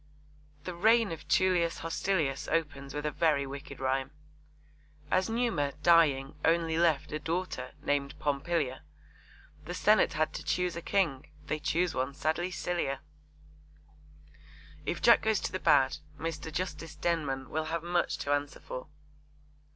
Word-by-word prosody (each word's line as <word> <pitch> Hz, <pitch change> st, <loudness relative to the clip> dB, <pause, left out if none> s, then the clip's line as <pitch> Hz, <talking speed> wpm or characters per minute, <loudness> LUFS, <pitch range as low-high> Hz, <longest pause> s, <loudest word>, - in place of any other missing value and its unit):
The 180 Hz, -, -5 dB
reign 220 Hz, +4 st, +4 dB
of 165 Hz, -, -7 dB
Tullius 175 Hz, -4 st, +2 dB
Hostilius 165 Hz, -4 st, -1 dB
opens 145 Hz, -4 st, -2 dB
with 150 Hz, +1 st, -3 dB
a 150 Hz, -, 0 dB
very 150 Hz, -2 st, +2 dB
wicked 140 Hz, +1 st, -8 dB
rhyme: 135 Hz, 0 st, 0 dB, 1.0 s
As 185 Hz, +2 st, +2 dB
Numa, 225 Hz, -, 0 dB
dying, 150 Hz, -6 st, +4 dB
only 165 Hz, 0 st, +2 dB
left 165 Hz, -4 st, +2 dB
A 155 Hz, -, -2 dB
daughter, 165 Hz, -5 st, -3 dB
named 140 Hz, -1 st, -1 dB
Pompilia, 145 Hz, -1 st, -1 dB, 0.8 s
The -, -, -5 dB
Senate -, -, +4 dB
had -, -, 0 dB
to -, -, -5 dB
choose 180 Hz, -1 st, 0 dB
a 170 Hz, -, -4 dB
King. 165 Hz, -9 st, 0 dB, 0.2 s
They 155 Hz, -, -2 dB
choose 170 Hz, +2 st, 0 dB
one 130 Hz, +2 st, -2 dB
sadly 160 Hz, +4 st, 0 dB
sillier. 175 Hz, -6 st, -2 dB, 1.9 s
If -, -, -2 dB
Jack 235 Hz, -, +7 dB
goes 220 Hz, -2 st, +2 dB
to -, -, -2 dB
the 185 Hz, -, -3 dB
bad, 145 Hz, -6 st, +4 dB, 0.2 s
Mr. 160 Hz, -1 st, -4 dB
Justice 160 Hz, -2 st, -4 dB
Denman 145 Hz, -6 st, -1 dB
will 155 Hz, 0 st, -1 dB
have 165 Hz, +1 st, -3 dB
much 175 Hz, 0 st, 0 dB
to 140 Hz, -, -1 dB
answer 145 Hz, 0 st, -2 dB
for. 130 Hz, -, -7 dB
160 Hz, 145 wpm, -30 LUFS, 140-175 Hz, 1.9 s, Jack